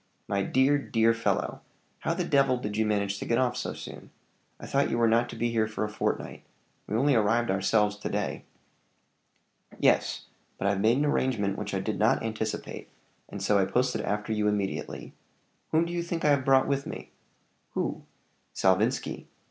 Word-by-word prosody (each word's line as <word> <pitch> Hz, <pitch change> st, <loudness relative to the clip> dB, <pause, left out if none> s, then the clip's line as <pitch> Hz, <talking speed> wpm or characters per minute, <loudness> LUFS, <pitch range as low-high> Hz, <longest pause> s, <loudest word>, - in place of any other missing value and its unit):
"My 100 Hz, -1 st, 0 dB
dear, 130 Hz, +8 st, +3 dB
dear 115 Hz, -5 st, +2 dB
fellow, 115 Hz, 0 st, -1 dB, 0.4 s
how -, -, -1 dB
the -, -, -1 dB
devil 135 Hz, -2 st, +3 dB
did 105 Hz, -4 st, -4 dB
you 110 Hz, 0 st, +1 dB
manage 100 Hz, -1 st, 0 dB
to -, -, -5 dB
get 115 Hz, -, +1 dB
off 130 Hz, -1 st, +1 dB
so -, -, -3 dB
soon? -, -, -9 dB, 0.5 s
I -, -, -8 dB
thought 140 Hz, +1 st, +1 dB
you -, -, 0 dB
were 115 Hz, -1 st, +4 dB
not 115 Hz, +2 st, +3 dB
to -, -, -7 dB
be 120 Hz, 0 st, -1 dB
here 110 Hz, -1 st, +1 dB
for 110 Hz, 0 st, -3 dB
a 105 Hz, -, -2 dB
fortnight: 105 Hz, -, -3 dB, 0.5 s
we 105 Hz, -, -2 dB
only 140 Hz, +4 st, +3 dB
arrived 115 Hz, 0 st, +2 dB
ourselves 105 Hz, +2 st, +2 dB
to 105 Hz, -, -4 dB
day." -, -, -2 dB, 1.3 s
"Yes -, -, +2 dB, 0.3 s
but -, -, -4 dB
I've 100 Hz, -1 st, +1 dB
made 115 Hz, +4 st, +4 dB
an 145 Hz, -, +2 dB
arrangement 115 Hz, -9 st, +1 dB
which 105 Hz, -1 st, -4 dB
I 95 Hz, -, 0 dB
did 110 Hz, +2 st, -3 dB
not 110 Hz, +1 st, +3 dB
anticipate; 110 Hz, -1 st, -4 dB, 0.4 s
and -, -, -6 dB
so 105 Hz, -1 st, +3 dB
I 95 Hz, -, +3 dB
posted 125 Hz, +5 st, 0 dB
after 105 Hz, +2 st, -2 dB
you 105 Hz, -1 st, +1 dB
immediately. 100 Hz, -2 st, -3 dB, 0.6 s
Whom 160 Hz, +1 st, +3 dB
do 170 Hz, -, -5 dB
you 175 Hz, -, -1 dB
think 170 Hz, -1 st, -3 dB
I -, -, +5 dB
have 135 Hz, -2 st, +2 dB
brought 135 Hz, -1 st, +4 dB
with 140 Hz, 0 st, -1 dB
me?" -, -, -8 dB, 0.6 s
"Who?" -, -, -2 dB, 0.5 s
"Salvinski." 100 Hz, +7 st, +1 dB
110 Hz, 190 wpm, -28 LUFS, 105-130 Hz, 1.3 s, I